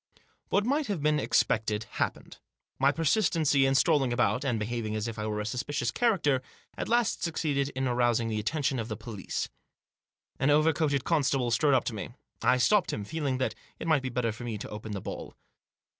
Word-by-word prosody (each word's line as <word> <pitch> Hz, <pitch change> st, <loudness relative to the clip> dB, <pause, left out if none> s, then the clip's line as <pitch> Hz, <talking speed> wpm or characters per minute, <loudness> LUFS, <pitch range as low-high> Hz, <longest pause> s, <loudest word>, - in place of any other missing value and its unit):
What 205 Hz, -, +2 dB
might 280 Hz, +3 st, +1 dB
have 190 Hz, -8 st, -2 dB
been 150 Hz, 0 st, +3 dB
expected 110 Hz, -5 st, +1 dB
happened. -, -, -4 dB, 0.4 s
My 135 Hz, +1 st, +5 dB
persistency 155 Hz, -4 st, +2 dB
in 135 Hz, -, +2 dB
strolling 135 Hz, -1 st, +3 dB
abouf, 120 Hz, +2 st, +1 dB
and 125 Hz, -5 st, 0 dB
behaving 110 Hz, 0 st, -3 dB
as 110 Hz, +1 st, -2 dB
if 115 Hz, -1 st, -6 dB
I 105 Hz, -, -2 dB
were 105 Hz, 0 st, -2 dB
a 105 Hz, -, -3 dB
suspicious 120 Hz, +1 st, -2 dB
character, 160 Hz, -, +2 dB, 0.3 s
at -, -, -4 dB
last 235 Hz, -1 st, +2 dB
succeeded 145 Hz, -4 st, 0 dB
in 130 Hz, 0 st, 0 dB
arousing 120 Hz, -2 st, +2 dB
the 110 Hz, -1 st, -1 dB
attention 135 Hz, +3 st, -1 dB
of 110 Hz, -, -3 dB
the 110 Hz, -3 st, -5 dB
police. 105 Hz, -3 st, -4 dB, 0.9 s
An 135 Hz, -, +2 dB
over 155 Hz, +2 st, +4 dB
coated 145 Hz, -5 st, 0 dB
constable 135 Hz, -6 st, +1 dB
strode 140 Hz, +5 st, +3 dB
up 130 Hz, -, +3 dB
to -, -, -3 dB
me. 105 Hz, -, -5 dB, 0.3 s
I 125 Hz, -, +4 dB
stopped 200 Hz, +10 st, +3 dB
him, 105 Hz, -, -3 dB
feeling 140 Hz, 0 st, -2 dB
that 130 Hz, -, -1 dB, 0.2 s
it -, -, -6 dB
might 155 Hz, -4 st, +3 dB
be 130 Hz, -, -3 dB
better 120 Hz, -2 st, 0 dB
for 110 Hz, +3 st, -9 dB
me 115 Hz, -3 st, -3 dB
to 105 Hz, -, -7 dB
open 105 Hz, 0 st, -6 dB
the 100 Hz, -, -4 dB
ball. -, -, -7 dB
130 Hz, 200 wpm, -29 LUFS, 115-150 Hz, 0.9 s, My